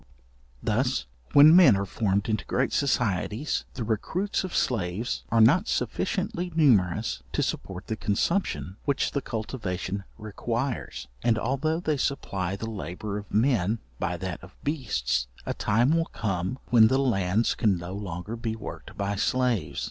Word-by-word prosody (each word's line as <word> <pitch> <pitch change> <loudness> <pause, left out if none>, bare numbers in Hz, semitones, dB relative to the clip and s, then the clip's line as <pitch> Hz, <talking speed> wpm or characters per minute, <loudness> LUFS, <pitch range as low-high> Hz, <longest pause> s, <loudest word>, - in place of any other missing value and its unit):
Thus - - 0 0.3
when 150 +3 +9
men 175 - +8
are 100 - -1
formed 100 0 0
into 110 -4 0
great 130 +1 0
societies, 125 -1 0
the 120 - -3
recruits 165 - -1
of 185 - -5
slaves 110 0 -1
are 115 - +2
not 160 - +5
sufficiently 180 -2 -1
numerous 110 - +3
to - - +1
support 95 -1 -4
the 110 - -3
consumption 105 - -1
which 140 -2 +1
the 140 - -1
cultivation 100 -5 -4
requires. 115 - -3
And 115 -2 +2
although 140 +7 0
they 155 -4 0
supply 100 -9 -2
the 110 +3 -5
labour 100 +1 -4
of 105 - -12
men 110 -2 +2 0.2
by 90 - -1
that 90 +1 -5
of 95 - -13
beasts, 105 - -1 0.2
a - - -1
time 120 +9 +2
will 165 0 +2
come, 95 - -2
when 115 -2 +8
the 130 - +2
lands 110 -5 +2
can 100 -4 +2
no 85 +2 -6
longer 100 +1 -5
be 115 -1 -3
worked 110 - -9
by 100 0 -1
slaves. 125 -6 0
110 Hz, 150 wpm, -27 LUFS, 95-135 Hz, 0.3 s, when